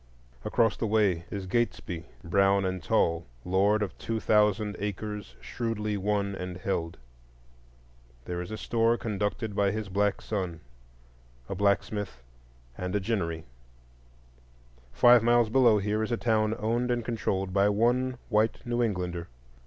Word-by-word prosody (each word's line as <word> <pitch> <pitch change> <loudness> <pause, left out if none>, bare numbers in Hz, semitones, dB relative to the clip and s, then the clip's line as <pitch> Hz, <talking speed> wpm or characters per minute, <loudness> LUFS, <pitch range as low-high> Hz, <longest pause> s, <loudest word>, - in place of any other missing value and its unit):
Across 115 -3 +2
the 115 - -1
way 100 -6 +2
is 100 -2 -5
Gatesby, 95 -5 -2 0.2
brown 100 +2 +3
and 95 -1 -2
tall, 85 -2 +1 0.2
lord 100 +3 +2
of 95 -5 -5
two 115 -1 -2
thousand 105 -1 +2
acres 105 +1 -5
shrewdly 110 -3 -3
won 100 0 0
and 90 -1 -5
held. 85 -3 -3 1.3
There 90 0 -3
is 90 - -7
a 110 - -5
store 115 +1 +1
conducted 105 0 -2
by 100 -1 +3
his 105 0 -3
black 100 +2 +1
son, 90 -6 -4 0.9
a - - -4
blacksmith 100 - 0 0.6
shop, - - -4
and 90 +2 -2
a - - +3
ginnery. 90 -6 -2 1.5
Five 120 -1 +6
miles 120 0 +3
below 120 -4 +5
here 105 +2 0
is 110 - -2
a 120 - +1
town 110 -2 +1
owned 120 +2 0
and 120 -2 0
controlled 95 -5 -2
by 100 +1 +4
one 120 +4 +1
white 110 0 +2
New 120 0 0
Englander. 90 -6 -2
105 Hz, 145 wpm, -28 LUFS, 95-115 Hz, 1.5 s, Five